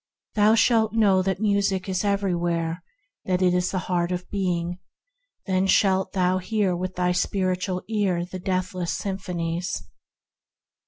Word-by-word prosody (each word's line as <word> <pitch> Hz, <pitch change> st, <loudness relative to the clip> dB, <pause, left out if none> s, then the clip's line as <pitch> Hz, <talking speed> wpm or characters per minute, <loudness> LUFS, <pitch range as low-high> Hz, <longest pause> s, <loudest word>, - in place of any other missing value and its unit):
Thou 215 Hz, +1 st, +4 dB
shalt 225 Hz, -1 st, +3 dB
know 200 Hz, -4 st, +4 dB
that 190 Hz, 0 st, -1 dB
Music 200 Hz, -2 st, +1 dB
is 185 Hz, 0 st, -1 dB
everywhere; 175 Hz, -4 st, 0 dB, 0.4 s
that 185 Hz, 0 st, +1 dB
it 180 Hz, -1 st, +4 dB
is 180 Hz, 0 st, +1 dB
the 190 Hz, -, -2 dB
Heart 175 Hz, -1 st, 0 dB
of 180 Hz, 0 st, -3 dB
Being; 180 Hz, -3 st, -1 dB, 0.7 s
then 190 Hz, -1 st, +1 dB
shalt 190 Hz, -1 st, +3 dB
thou 185 Hz, -1 st, +2 dB
hear 195 Hz, -1 st, 0 dB
with 185 Hz, +1 st, -4 dB
thy 180 Hz, 0 st, +1 dB
spiritual 185 Hz, 0 st, -1 dB
ear 195 Hz, -5 st, 0 dB
the 185 Hz, +1 st, -7 dB
Deathless 185 Hz, -1 st, -2 dB
Sympathies. 180 Hz, -3 st, -3 dB
185 Hz, 140 wpm, -24 LUFS, 180-195 Hz, 0.7 s, Thou